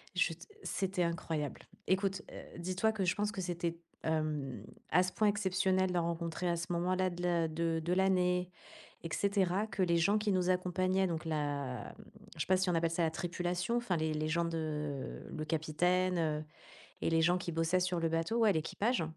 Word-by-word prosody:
je - - +2
te - - -12 0.2
c'était 185 -1 -1
incroyable. 160 -3 -2 0.3
Écoute, 190 0 +1
heu, - - -10
dis-toi 185 +5 +1
que 205 -3 -1
je 180 - +2
pense 210 0 0
que 210 - -6
c'était, 170 -2 -2 0.2
hem, 155 -4 -1 0.3
à 180 - +6
ce 185 - -2
point 215 -1 +3
exceptionnel 190 -2 +1
d'en 175 -1 +2
rencontrer 170 +1 -2
à 170 - +1
ce 170 - -3
moment-là 185 +2 +1
de 175 0 -6
l'a 170 -2 +2
de 165 +1 0
de 175 +2 +1
l'année, 180 -1 +2 0.5
et 165 - -4
cetera, 200 0 +1
que 200 -3 -2
les 170 -2 +3
gens 195 +5 +4
qui 210 0 +1
nous 185 -1 +1
accompagnaient, 185 +1 +2
donc 165 -1 -3
la 145 -5 -2
m 215 - -12 0.3
je 155 - -9
sais - - -5
pas 185 - +4
si 185 0 +1
on - - +1
appelle 165 0 +2
ça 170 +1 0
la 160 - +2
tripulation, 175 +5 -1
enfin 220 -8 0
les 155 -1 0
les 155 0 -1
gens 170 +2 +1
de 165 0 -2 0.7
heu, - - -10
le 155 - -3
capitaine, 175 +4 +1
heu 155 -2 0 0.6
et - - +1
les 165 0 +3
gens 175 +2 +4
qui 175 -1 -4
bossaient 165 +3 +2
sur 180 -1 0
le 165 - +2
bateau 165 +8 0
Ouais, 220 -3 +5
l'équipage. 200 +7 0
175 Hz, 205 wpm, -34 LUFS, 165-185 Hz, 0.7 s, à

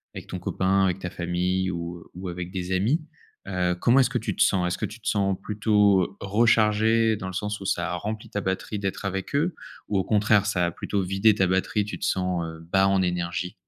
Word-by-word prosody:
avec - - -8
ton - - -5
copain, 95 +1 +1
avec 95 0 0
ta 90 - -4
famille 90 +1 -1
ou 85 0 -6
ou 90 +1 -6
avec 90 0 -6
des 90 -1 -4
amis, 110 - +1 0.4
heu, 90 -2 0
comment 125 +3 +5
est-ce 130 -1 +3
que 125 - 0
tu 115 - -3
te - - +4
sens? 90 -2 +2
Est-ce 90 - -2
que - - -2
tu 110 +2 -9
te - - -8
sens 100 -2 +1
plutôt, 105 -2 +3
heu, - - -1
rechargé, 110 +1 +3
dans 100 - -7
le 95 - -6
sens 105 +2 -3
où - - -7
ça 85 -3 -1
a - - -1
rempli 105 +4 -5
ta 100 - -3
batterie 95 +2 -3
d'être 100 0 -3
avec 95 -1 -3
eux, 160 +5 +1 0.3
ou 105 - 0
au 95 - +2
contraire 105 -1 +3
ça 90 -5 +1
a - - -2
plutôt 100 +3 -2
vidé 95 +4 +3
ta 95 -2 +2
batterie, 95 +3 +1
tu 105 - -6
te - - -4
sens, 90 -2 0
heu, 80 0 -8
bas 95 0 +4
en 95 -1 +3
énergie? 90 0 -2
95 Hz, 235 wpm, -25 LUFS, 90-105 Hz, 0.4 s, comment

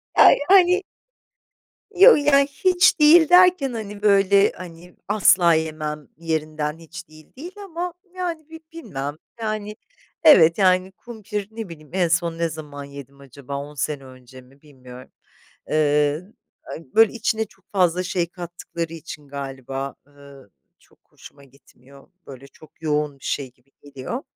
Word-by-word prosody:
Aaa, - - +8 0.2
yani... 370 -1 +5 1.1
Yo, 395 +7 +8
yani 280 -1 +3
hiç 360 +5 +2
değil 315 +1 +6
derken 360 -6 +5
hani 210 -3 -7
böyle, 200 -1 +4
hani, 175 0 -12
asla 180 -5 +4
yemem 155 -2 -4
yerinden 155 -1 -3
hiç 165 +1 -11
değil, 155 0 -18
değil 335 +7 -9
ama 350 -1 -5 0.2
yani 340 -4 -5
bi 320 0 -11
bilmem. 145 - -6 0.2
Yani 215 -1 -4 0.5
evet, 165 - +6
yani 185 -1 +2
kumpir, 210 -1 -7
ne 220 -2 -7
bileyim 155 -3 -13
,en 180 -2 +1
son 170 0 -1
ne 170 0 0
zaman 150 -3 -9
yedim 140 -1 -12
acaba 140 0 -9
10 145 +1 -8
sene 145 -1 -4
önce 130 0 -15
mi, 135 +2 -23
bilmiyorum. 130 -4 -14 0.6
Eee, 150 0 +1 0.4
a - - -8 0.2
böyle 225 -2 +5
içine 225 -1 -1
çok 195 -2 -24
fazla 180 -2 +1
şey 180 -1 -2
kattıkları 170 -1 -7
için 155 -3 -10
galiba, 135 -1 -6
eee, 145 - -27 0.7
çok - - -28
hoşuma 140 -1 -16
gitmiyor, 135 0 -21 0.2
böyle 135 0 -12
çok 155 +3 -20
yoğun 150 -2 -2
bir - - -19
şey 135 -3 -3
gibi 125 +2 -36
geliyor. 145 - -7
165 Hz, 145 wpm, -22 LUFS, 145-215 Hz, 1.1 s, Aaa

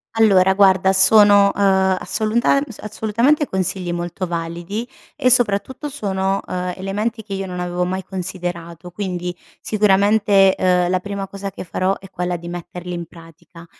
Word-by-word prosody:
Allora, 195 -4 +4
guarda 190 -1 +4
sono, 200 +1 +6
uhm, 190 -1 +3
assolunta 225 +7 +1 0.2
assolutamente 230 +8 0
consigli 185 -1 -2
molto 175 +2 -4
validi 170 +6 -4 0.3
e 255 - +2
soprattutto 245 +3 +1
sono, 195 -8 -2
uhm, 180 0 -3
elementi 210 +4 -3
che 200 -1 -8
io 195 0 -3
non 180 -1 -5
avevo 180 0 -2
mai 185 +1 -3
considerato 175 -2 -6
quindi, 180 -2 -4 0.3
sicuramente, 200 -1 +3
uhm, 180 -1 +2
la 185 0 +1
prima 200 0 -5
cosa 195 0 -6
che 195 - -8
farò 185 +2 -1
è 195 - -14
quella 180 -1 -3
di 170 0 -8
metterli 175 +1 -7
in 170 -1 -5
pratica. 165 0 -16
190 Hz, 150 wpm, -19 LUFS, 180-205 Hz, 0.3 s, sono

